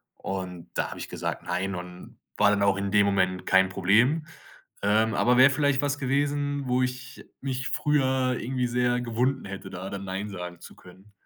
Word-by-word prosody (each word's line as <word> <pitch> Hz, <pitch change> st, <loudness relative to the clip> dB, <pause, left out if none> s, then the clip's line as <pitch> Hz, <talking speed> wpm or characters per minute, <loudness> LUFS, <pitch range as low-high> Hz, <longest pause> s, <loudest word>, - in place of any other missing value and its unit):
Und 90 Hz, -3 st, -6 dB
da -, -, -1 dB
habe -, -, -8 dB
ich -, -, -6 dB
gesagt: -, -, -4 dB
„Nein“, 90 Hz, +2 st, -2 dB
und 90 Hz, 0 st, -9 dB, 0.2 s
war 105 Hz, -, +5 dB
dann 100 Hz, -1 st, +2 dB
auch 100 Hz, -1 st, +3 dB
in 100 Hz, 0 st, -2 dB
dem 105 Hz, 0 st, +5 dB
Moment 95 Hz, -2 st, +1 dB
kein 95 Hz, 0 st, +4 dB
Problem. 115 Hz, -, +3 dB, 0.6 s
Ähm, 110 Hz, +2 st, +3 dB
aber 125 Hz, +3 st, +3 dB
wäre 130 Hz, +2 st, +8 dB
vielleicht 140 Hz, -1 st, +1 dB
was 145 Hz, 0 st, -1 dB
gewesen, 145 Hz, +1 st, 0 dB
wo 125 Hz, +1 st, +2 dB
ich 125 Hz, 0 st, -4 dB, 0.2 s
mich 135 Hz, 0 st, -3 dB
früher 130 Hz, -3 st, +1 dB
irgendwie 125 Hz, 0 st, -1 dB
sehr 125 Hz, 0 st, +1 dB
gewunden 125 Hz, +3 st, -1 dB
hätte, 95 Hz, 0 st, -7 dB
da 95 Hz, 0 st, -6 dB
dann 100 Hz, 0 st, -6 dB
nein 95 Hz, +2 st, -4 dB
sagen 90 Hz, -3 st, -7 dB
zu -, -, -12 dB
können. 95 Hz, +3 st, -17 dB
110 Hz, 185 wpm, -26 LUFS, 95-130 Hz, 0.6 s, wäre